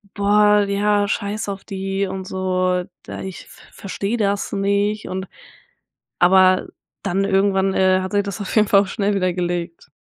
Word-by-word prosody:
„Boah, 210 Hz, 0 st, +4 dB
ja, 205 Hz, 0 st, +1 dB
scheiß 205 Hz, 0 st, -3 dB
auf 195 Hz, -1 st, -6 dB
die 195 Hz, 0 st, -3 dB
und 190 Hz, 0 st, -5 dB
so, 185 Hz, -1 st, 0 dB, 0.2 s
da -, -, -7 dB
ich 190 Hz, -1 st, -8 dB
ver -, -, -16 dB
verstehe 200 Hz, +3 st, -4 dB
das 200 Hz, -2 st, -1 dB
nicht 200 Hz, +1 st, 0 dB
und“ 190 Hz, +1 st, -4 dB, 0.9 s
Aber 185 Hz, +1 st, +5 dB, 0.3 s
dann 195 Hz, 0 st, 0 dB
irgendwann, 195 Hz, -1 st, +2 dB
äh, 185 Hz, 0 st, +3 dB
hat 185 Hz, +1 st, -5 dB
sich 205 Hz, 0 st, +2 dB
das 200 Hz, +1 st, -5 dB
auf 200 Hz, -, -4 dB
jeden 210 Hz, -1 st, +4 dB
Fall 195 Hz, -, +6 dB
auch -, -, -5 dB
schnell 205 Hz, 0 st, -1 dB
wieder 185 Hz, -2 st, +1 dB
gelegt. 175 Hz, -2 st, -4 dB
195 Hz, 170 wpm, -20 LUFS, 185-205 Hz, 0.9 s, Fall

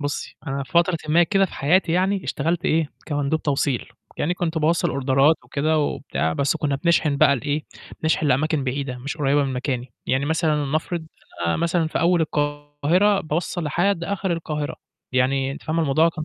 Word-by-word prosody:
بُصّي، 145 Hz, 0 st, -4 dB
أنا 135 Hz, 0 st, -2 dB
في 185 Hz, -, -13 dB
فترةٍ 170 Hz, 0 st, +3 dB
ما 170 Hz, +3 st, +5 dB
كده 195 Hz, +2 st, +3 dB
في 190 Hz, -, -6 dB
حياتي 165 Hz, +5 st, +2 dB
يعني 190 Hz, +2 st, +1 dB
اشتغلت 170 Hz, +1 st, -1 dB
إيه، 160 Hz, -2 st, +2 dB, 0.2 s
كمندوب 145 Hz, +1 st, -1 dB
توصيل، 140 Hz, -3 st, 0 dB, 0.3 s
يعني 175 Hz, +4 st, 0 dB
كنت 170 Hz, -2 st, -2 dB
باوصّل 165 Hz, +2 st, +2 dB
أوردرات 140 Hz, +3 st, +3 dB
وكده 155 Hz, +2 st, 0 dB
وبتاع، 80 Hz, -, -1 dB
بس 140 Hz, -, +1 dB
كنّا 145 Hz, -3 st, -1 dB
بنشحِن 155 Hz, -1 st, +2 dB
بقى 140 Hz, 0 st, +5 dB
لإيه، 145 Hz, +4 st, -2 dB, 0.4 s
بنشحن 160 Hz, -1 st, +1 dB
لأماكن 145 Hz, +2 st, +1 dB
بعيدة 130 Hz, -1 st, -3 dB
مش 140 Hz, +5 st, -5 dB
قريّبة 145 Hz, -1 st, +2 dB
من 135 Hz, -, -2 dB
مكاني، 125 Hz, -1 st, -3 dB
يعني 135 Hz, +2 st, +1 dB
مثلًا 155 Hz, -2 st, +1 dB
لنَفرض 160 Hz, +3 st, -2 dB, 0.4 s
أنا 85 Hz, -, +1 dB
مثلًا 170 Hz, 0 st, +1 dB
في -, -, -2 dB
أول 175 Hz, 0 st, +3 dB
القاهرة 145 Hz, +6 st, +1 dB
باوصّل 170 Hz, +1 st, -2 dB
لحد 170 Hz, +4 st, +1 dB
آخِر 195 Hz, -1 st, -1 dB
القاهرة، 150 Hz, -3 st, -3 dB, 0.4 s
يعني 135 Hz, +1 st, +1 dB
أنتِ -, -, -9 dB
فاهمة 160 Hz, +1 st, -1 dB
الموضوع 155 Hz, +3 st, +3 dB
كان 155 Hz, -2 st, -5 dB
155 Hz, 175 wpm, -23 LUFS, 140-170 Hz, 0.4 s, ما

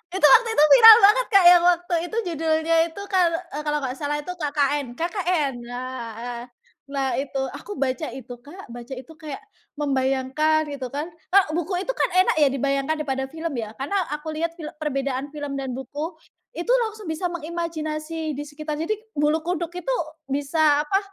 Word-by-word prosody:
Itu 380 Hz, -, -4 dB
waktu 460 Hz, -1 st, +6 dB
itu 300 Hz, -, +5 dB
viral 450 Hz, -3 st, +11 dB
banget, 425 Hz, +5 st, +6 dB
Kak, 395 Hz, -4 st, +5 dB
yang 350 Hz, 0 st, +8 dB
waktu 350 Hz, 0 st, +2 dB
itu 445 Hz, -, -6 dB
judulnya 320 Hz, +1 st, +1 dB
itu 370 Hz, +5 st, -9 dB
kalau 350 Hz, -3 st, +3 dB, 0.2 s
eee, 300 Hz, +1 st, -5 dB
kalau 295 Hz, 0 st, +1 dB
nggak 255 Hz, 0 st, -3 dB
salah 295 Hz, 0 st, -2 dB
itu 360 Hz, -, -5 dB
KKN 290 Hz, -5 st, -1 dB
KKN 345 Hz, -, -1 dB
nah, 250 Hz, 0 st, -6 dB, 0.2 s
eee, 240 Hz, -1 st, -5 dB, 0.4 s
nah 275 Hz, -1 st, -2 dB
itu, 275 Hz, -1 st, -3 dB
aku 410 Hz, -, -8 dB
baca 275 Hz, +3 st, -1 dB
itu, 250 Hz, -2 st, -9 dB
Kak 305 Hz, +5 st, -13 dB
baca 240 Hz, +2 st, -8 dB
itu 260 Hz, +5 st, -11 dB
kayak 305 Hz, +4 st, -7 dB, 0.3 s
membayangkan 285 Hz, +2 st, 0 dB
itu 270 Hz, -3 st, -5 dB
kan, 295 Hz, +7 st, -5 dB
e 335 Hz, +4 st, -1 dB
buku 350 Hz, +3 st, -2 dB
itu -, -, -1 dB
kan -, -, 0 dB
enak 370 Hz, -2 st, +4 dB
ya 290 Hz, -, +6 dB
dibayangkan 275 Hz, +3 st, 0 dB
daripada 265 Hz, -3 st, -3 dB
film 320 Hz, +2 st, -5 dB
ya. 220 Hz, 0 st, -6 dB
Karena 285 Hz, +10 st, -2 dB
aku 300 Hz, +1 st, -5 dB
lihat 330 Hz, +2 st, -3 dB
fil 310 Hz, -3 st, -7 dB
perbedaan 275 Hz, -2 st, -2 dB
film 285 Hz, -2 st, -4 dB
dan 260 Hz, -2 st, -4 dB
buku, 295 Hz, +6 st, -6 dB, 0.4 s
itu 345 Hz, +8 st, -2 dB, 0.2 s
langsung 425 Hz, -6 st, -7 dB
bisa 355 Hz, +3 st, -2 dB
mengimajinasi 320 Hz, -1 st, -4 dB
di 290 Hz, -, -4 dB
sekitar. 300 Hz, +1 st, -5 dB
Jadi, 370 Hz, +7 st, -1 dB, 0.2 s
bulu 305 Hz, +2 st, +2 dB
kuduk 345 Hz, 0 st, -3 dB
itu, -, -, -2 dB, 0.4 s
bisa 290 Hz, +1 st, +2 dB
apa, 390 Hz, +3 st, +2 dB
305 Hz, 180 wpm, -23 LUFS, 275-345 Hz, 0.4 s, viral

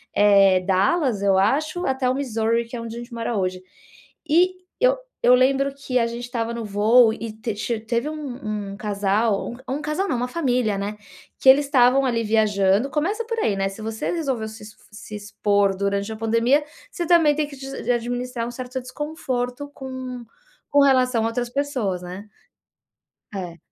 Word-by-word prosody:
eh, 195 Hz, -2 st, +5 dB
Dallas, 200 Hz, -, +1 dB
eu 195 Hz, -1 st, +3 dB
acho, 305 Hz, -, +1 dB
até 265 Hz, -1 st, 0 dB
o 255 Hz, -, +1 dB
Missouri, 230 Hz, -3 st, 0 dB
que 230 Hz, -, -9 dB
é 235 Hz, -, -5 dB
onde 230 Hz, 0 st, -7 dB
a -, -, -6 dB
gente 240 Hz, +1 st, -10 dB
mora 230 Hz, -1 st, -2 dB
hoje. 185 Hz, -1 st, -2 dB, 0.7 s
E 360 Hz, +4 st, +4 dB, 0.3 s
eu -, -, +4 dB, 0.3 s
eu 250 Hz, -, +7 dB
lembro 270 Hz, +2 st, +2 dB
que 265 Hz, -2 st, -1 dB
a 230 Hz, -, +2 dB
gente 235 Hz, +1 st, -6 dB
estava 235 Hz, -2 st, -3 dB
no 235 Hz, -1 st, -4 dB
voo 220 Hz, +3 st, +5 dB
e 225 Hz, -1 st, -6 dB
teve 220 Hz, -1 st, -5 dB
ti 230 Hz, +2 st, -2 dB
teve 235 Hz, +5 st, -1 dB
um 245 Hz, -9 st, -5 dB
um 200 Hz, -, -8 dB
casal, 205 Hz, +1 st, 0 dB
um 270 Hz, +3 st, -2 dB
casal 305 Hz, +6 st, -1 dB
não, -, -, +1 dB
uma 245 Hz, +1 st, -1 dB
família, 250 Hz, -8 st, 0 dB
né, 205 Hz, +2 st, -4 dB, 0.4 s
que 265 Hz, -, +5 dB
eles 280 Hz, +2 st, +7 dB
estavam 265 Hz, -1 st, +4 dB
ali 235 Hz, -3 st, 0 dB
viajando, 210 Hz, +1 st, +2 dB
começa 390 Hz, +11 st, -1 dB
por 460 Hz, 0 st, -3 dB
aí, 210 Hz, -, +1 dB
né, 195 Hz, 0 st, 0 dB
se 195 Hz, +3 st, -10 dB
você 220 Hz, 0 st, -3 dB
resolveu 270 Hz, -10 st, -2 dB
se 220 Hz, 0 st, -11 dB, 0.3 s
se 210 Hz, 0 st, -9 dB
expor 205 Hz, -1 st, +1 dB
durante 200 Hz, +1 st, -1 dB
a -, -, -4 dB
pandemia, 230 Hz, +6 st, +2 dB, 0.3 s
você 345 Hz, -, -3 dB
também 325 Hz, -4 st, +5 dB
tem 305 Hz, 0 st, 0 dB
que 285 Hz, -, -11 dB
de 270 Hz, 0 st, -8 dB
se 270 Hz, -, -2 dB
administrar 245 Hz, 0 st, -2 dB
um -, -, -5 dB
certo 255 Hz, +1 st, -5 dB
desconforto 255 Hz, -1 st, -4 dB
com 260 Hz, -2 st, -7 dB, 0.5 s
com 285 Hz, 0 st, +5 dB
relação 255 Hz, -4 st, +3 dB
a -, -, +1 dB
outras 240 Hz, +1 st, -2 dB
pessoas 250 Hz, -9 st, -2 dB
né? 185 Hz, +4 st, -8 dB, 1.1 s
É. 175 Hz, -3 st, -6 dB
235 Hz, 185 wpm, -23 LUFS, 210-270 Hz, 1.1 s, eu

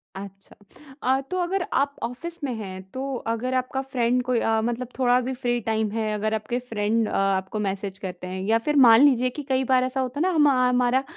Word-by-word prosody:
अच्छा। 195 Hz, 0 st, -10 dB, 0.5 s
अ, 260 Hz, +1 st, +2 dB
तो 370 Hz, -, -1 dB
अगर 370 Hz, +1 st, -1 dB
आप 280 Hz, +1 st, +1 dB
ऑफिस 295 Hz, +8 st, -6 dB
में 260 Hz, -, -1 dB
हैं 190 Hz, -3 st, -7 dB
तो 260 Hz, -, -4 dB, 0.3 s
अगर 230 Hz, +3 st, -1 dB
आपका 260 Hz, +1 st, -1 dB
फ़्रेंड 250 Hz, -2 st, 0 dB
कोई 250 Hz, -1 st, +1 dB
अ, 225 Hz, 0 st, +1 dB
मतलब 240 Hz, +1 st, -2 dB
थोड़ा 250 Hz, -1 st, +3 dB
भी 255 Hz, +1 st, -3 dB
फ़्री 245 Hz, -1 st, -1 dB
टाइम 220 Hz, 0 st, -1 dB
है 220 Hz, -1 st, -2 dB
अगर 215 Hz, +1 st, -1 dB
आपके 220 Hz, +3 st, -2 dB
फ़्रेंड 225 Hz, -2 st, -1 dB
अ, -, -, -6 dB
आपको 195 Hz, +1 st, 0 dB
मैसेज़ 195 Hz, -1 st, -3 dB
करते 180 Hz, -1 st, -6 dB
हैं 185 Hz, +1 st, -5 dB
या 225 Hz, +1 st, +4 dB
फिर 295 Hz, -, +2 dB
मान 225 Hz, +1 st, +8 dB
लीजिए 255 Hz, -2 st, +3 dB
कि 290 Hz, +3 st, -7 dB
कई 260 Hz, 0 st, +2 dB
बार 255 Hz, -, +4 dB
ऐसा 255 Hz, +1 st, -2 dB
होता 260 Hz, +2 st, -4 dB
है -, -, 0 dB
ना, 370 Hz, -, +2 dB
हम 310 Hz, -4 st, +4 dB
हमारा 250 Hz, -1 st, +2 dB
245 Hz, 220 wpm, -24 LUFS, 215-260 Hz, 0.5 s, मान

